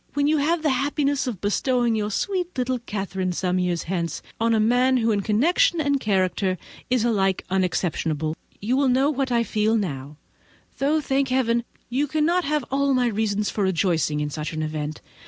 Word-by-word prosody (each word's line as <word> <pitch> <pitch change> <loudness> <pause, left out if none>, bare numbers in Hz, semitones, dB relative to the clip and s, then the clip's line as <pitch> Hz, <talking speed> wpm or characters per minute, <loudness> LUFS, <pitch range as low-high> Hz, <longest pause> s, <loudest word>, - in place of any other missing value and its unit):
When 285 0 +2
you 305 +1 +3
have 315 +3 +1
the 300 - +3
happiness 280 +1 0
of 220 -8 -4
bestowing 240 +3 +1
your 210 -1 -1
sweet 360 - -2
little 255 0 0
Catherine, 195 -4 -3
some 180 +1 0
years 180 -2 0
hence, 170 -3 -3 0.2
on 230 0 +2
a - - +2
man 250 +4 +3
who 230 -2 +2
in 205 -2 +1
connection 335 - +2
and 285 -2 +1
character 190 -3 0 0.3
is 245 -2 +2
alike 195 -5 +1
unexceptionable, 165 -4 0 0.2
you 230 +5 0
will 275 -1 +3
know 265 +4 +3
what 270 -2 -2
I 235 -1 +3
feel 220 0 +1
now; 145 -7 -4 0.6
though, 300 +3 +2
thank 275 -1 0
Heaven, 235 -2 +1 0.2
you 270 +4 0
cannot 320 +5 +1
have 300 -2 0
all 275 0 +2
my 250 -1 +2
reasons 210 -1 -1
for 205 - -1
rejoicing 165 -5 +1
in 150 0 -2
such 155 +3 -4
an 155 0 -2
event. 155 -1 -4
230 Hz, 185 wpm, -24 LUFS, 185-275 Hz, 0.6 s, you